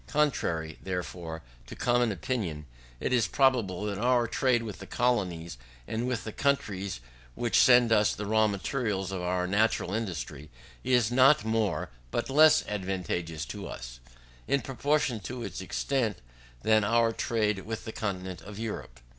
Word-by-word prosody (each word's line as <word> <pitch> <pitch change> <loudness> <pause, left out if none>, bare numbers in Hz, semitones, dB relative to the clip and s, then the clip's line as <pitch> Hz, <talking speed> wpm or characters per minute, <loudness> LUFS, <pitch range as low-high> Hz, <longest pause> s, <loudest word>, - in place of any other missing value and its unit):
Contrary, 85 - 0
therefore, 90 -3 -5 0.2
to - - -8
common 120 -1 +2
opinion, 85 -5 -3 0.3
it - - -1
is 120 -3 +3
probable 115 -9 +2
that 100 -1 -3
our 120 +1 +3
trade 120 +1 +1
with 105 -4 -7
the - - -9
colonies, 90 - -1 0.3
and 115 +3 -2
with 125 -3 -2
the 110 - -5
countries 100 - -1 0.3
which 120 -2 +2
send 120 -2 +6
us 105 -1 +4
the 105 - -5
raw 110 +1 +3
materials 100 -1 -2
of 95 -2 -3
our 90 0 0
national 100 -1 +1
industry, 80 -9 -4 0.3
is 125 -3 +3
not 130 +2 +5
more 110 -2 0 0.2
but 120 - -2
less 155 +2 +6
advantageous 90 -5 -3
to - - -7
us, - - -8 0.5
in 140 - +2
proportion 135 -1 0
to 120 +4 -6
its 95 -3 -5
extent, 115 +3 -1 0.5
than 110 0 +4
our 115 +2 +3
trade 105 -3 0
with 110 +3 -6
the 110 - -5
continent 95 -4 -4
of 100 0 -10
Europe. 105 - -6
110 Hz, 155 wpm, -29 LUFS, 90-120 Hz, 0.5 s, send